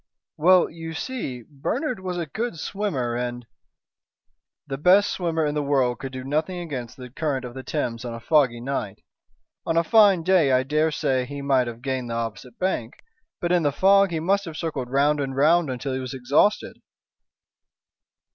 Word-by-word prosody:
"Well, 180 +3 +5
you 165 0 -8
see, 155 - -5
Bernard 240 - -3
was 185 -1 -4
a 170 - -2
good 220 - -4
swimmer, 155 - -2
and 120 0 -4 0.6
" - - -56
"The 135 -2 -5
best 190 +6 +5
swimmer 165 -3 -1
in 145 - -1
the 150 - 0
world 135 -4 +1
could 135 -1 -6
do 130 -1 -6
nothing 155 +7 -1
against 135 -9 -6
the 125 -2 -10
current 140 -3 -2
of 120 - -8
the 130 - -7
Thames 120 -5 -3
on 120 -1 -5
a - - -7
foggy 125 -2 +2
night. 120 -6 -4 0.6
On 165 - -1
a 165 - +4
fine 200 -2 +5
day 175 -6 +4
I 130 0 +3
dare 155 +4 +1
say 130 -4 0
he 140 +1 -6
might 135 -3 +2
have 120 +1 -8
gained 130 -3 -2
the 115 - -3
opposite 115 +1 -5
bank, 180 -11 -2 0.4
but 175 -1 -1
in 180 -1 +3
the 145 -2 +1
fog 195 +5 +4
he 165 -2 -2
must 195 +5 +1
have 160 -2 -7
circled 150 -7 -3
round 145 +3 +2
and 135 -2 -3
round 155 +3 +3
until 130 +1 -3
he 130 - -2
was 130 +1 -5
exhausted." 140 +11 +1
145 Hz, 190 wpm, -24 LUFS, 130-170 Hz, 0.6 s, Well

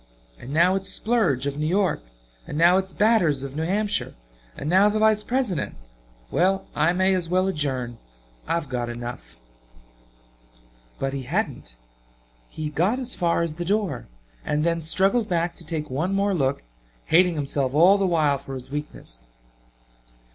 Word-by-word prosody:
And 125 - -9
now 170 +5 +4
its 195 0 -2
Splurge, 195 - +1
of 140 +1 -3
New 155 - 0
York; 185 0 +1 0.5
and 150 - -5
now 175 +3 +5
its 190 0 -5
Batters 180 -11 +2
of 140 0 -7
New 155 - -2
Hampshire 205 +4 -1 0.4
and - - -5
now 190 +5 +5
the 210 - -1
Vice 215 -1 +3
President! 235 - -1 0.6
Well 190 +2 +1
I 155 +3 +3
may 185 +2 +2
as 180 -3 -1
well 185 +1 +2
adjourn. 130 -9 -1 0.5
I've 165 -3 -1
got 120 -2 -3
enough." 120 - -7 1.6
But 135 0 -2
he 140 - -3
hadn't. 135 - -3 0.7
He 155 -1 -5
got 180 - +1
as 255 -1 -2
far 170 -1 +1
as 165 -2 -3
the 175 +3 -5
door 195 - -1 0.4
and 150 0 -1
then 165 0 0
struggled 195 +8 +2
back 170 -1 0
to - - -5
take 155 -3 -4
one 165 +9 -1
more 200 0 +1
look, 140 -5 0 0.4
hating 175 +1 +4
himself 140 -2 -1
all 185 +6 +6
the 195 - +2
while 150 -5 +2
for 135 0 -8
his 130 +1 -9
weakness. 100 - -7
170 Hz, 160 wpm, -24 LUFS, 140-195 Hz, 1.6 s, all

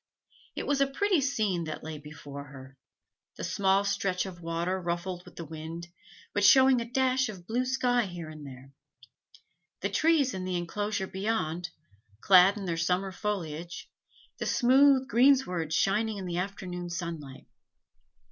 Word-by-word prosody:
It - - -4
was 285 -1 +1
a 275 - +4
pretty 360 +4 +1
scene 210 -10 0
that 155 - -6
lay 155 -1 -6
before 145 -1 -9
her 135 -1 -12 0.6
the - - -6
small 195 0 +2
stretch 200 -2 0
of 180 -2 -9
water 170 +3 -2
ruffled 175 +1 -3
with 180 - -15
the 170 - -7
wind, 160 +2 -7 0.4
but 205 - 0
showing 260 +3 +6
a - - -3
dash 260 0 +1
of 185 -5 -9
blue 245 +5 -1
sky 245 -3 +1
here 175 -3 -7
and 155 -1 -10
there 135 -1 -11 1.1
the 200 - 0
trees 290 +3 +3
in 185 - -4
the 185 -1 -1
inclosure 200 +3 -2
beyond, 185 -4 -2 0.5
clad 190 - +6
in 200 - -5
their 170 -2 -2
summer 180 +4 0
foliage, 175 -5 -5 0.5
the - - -2
smooth 265 +1 +4
greensward 235 - +3
shining 210 +5 +1
in 190 - -5
the 175 -1 -2
afternoon 180 -2 -5
sunlight. 170 -6 -6
185 Hz, 155 wpm, -29 LUFS, 170-225 Hz, 1.1 s, showing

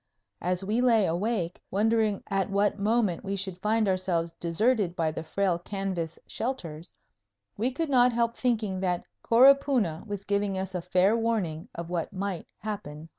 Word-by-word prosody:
As 180 +1 -1
we 215 +5 0
lay 230 -5 +4
awake, 180 0 -1
wondering 215 0 +1
at 195 0 -1
what 200 +1 +1
moment 210 -4 +1
we 200 0 -2
should 190 -2 -4
find 215 +1 +2
ourselves 185 -3 0
deserted 190 +2 +1
by 165 -3 0
the 160 - -5
frail 175 +2 0
canvas 185 -3 -4
shelters, 175 -11 -5 0.6
we 230 +5 0
could 315 +5 -2
not 250 -1 +5
help 235 0 +1
thinking 220 -7 -1
that 180 -2 -1 0.2
Coropuna 250 - +4
was 205 -1 -5
giving 200 -1 0
us 190 0 -4
a 180 - -2
fair 185 +4 +3
warning 220 -6 -1
of 170 0 -6
what 170 -2 -2
might 195 -2 -4
happen 205 -7 -5
higher 150 - -10
up. 165 - -14
195 Hz, 170 wpm, -28 LUFS, 175-225 Hz, 0.6 s, not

